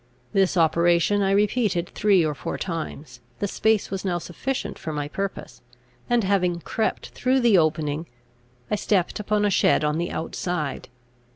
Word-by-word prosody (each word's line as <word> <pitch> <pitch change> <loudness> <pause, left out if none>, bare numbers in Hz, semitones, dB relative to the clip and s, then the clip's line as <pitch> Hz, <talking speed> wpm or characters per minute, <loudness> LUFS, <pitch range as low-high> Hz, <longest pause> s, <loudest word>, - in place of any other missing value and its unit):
This 195 -2 +2
operation 170 +4 +3
I 195 - +2
repeated 200 -3 +1
three 195 -5 +3
or 150 - 0
four - - -5
times 155 -7 -5 0.2
The 205 - -1
space 220 +1 +1
was 195 -1 -3
now 180 -3 0
sufficient 205 +5 -4
for 160 - -5
my 145 -1 -3
purpose: 190 -7 -5 0.5
and, 240 -2 +3
having 180 -3 +1
crept 220 +5 -2
through 260 +1 +1
the 225 -6 +5
opening, 155 0 0 0.6
I 210 - +2
stepped 195 -2 0
upon 210 0 +1
a 205 - +2
shed 170 - +3
on 150 +1 0
the 170 - -1
outside. 165 -3 -3
180 Hz, 160 wpm, -24 LUFS, 160-205 Hz, 0.6 s, the